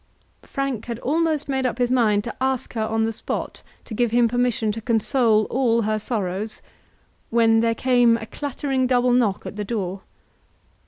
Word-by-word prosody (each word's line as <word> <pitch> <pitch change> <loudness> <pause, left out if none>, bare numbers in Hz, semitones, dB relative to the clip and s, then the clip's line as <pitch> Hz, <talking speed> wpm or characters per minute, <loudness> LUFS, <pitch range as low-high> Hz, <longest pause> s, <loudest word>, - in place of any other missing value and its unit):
Frank 275 -6 -4
had 235 -2 -4
almost 310 +3 0
made 265 -1 -1
up 250 -2 -1
his 245 -1 +1
mind 215 -5 +3
to 235 - -6
ask 265 -1 -1
her 225 - -2
on 220 0 0
the 225 - -2
spot - - -5 0.2
to - - -8
give 240 +2 +1
him 235 +1 +3
permission 245 -2 0
to 225 +2 -5
console 225 0 +2
all 235 -3 +2
her 215 0 0
sorrows, 210 -1 -3 0.7
when 225 -1 +4
there 230 0 +1
came 245 -2 +3
a 225 - -7
clattering 270 +1 -2
double 250 -1 +2
knock 230 -6 +1
at 205 - -7
the 210 - -2
door. 195 -3 -3
235 Hz, 175 wpm, -23 LUFS, 220-255 Hz, 0.7 s, when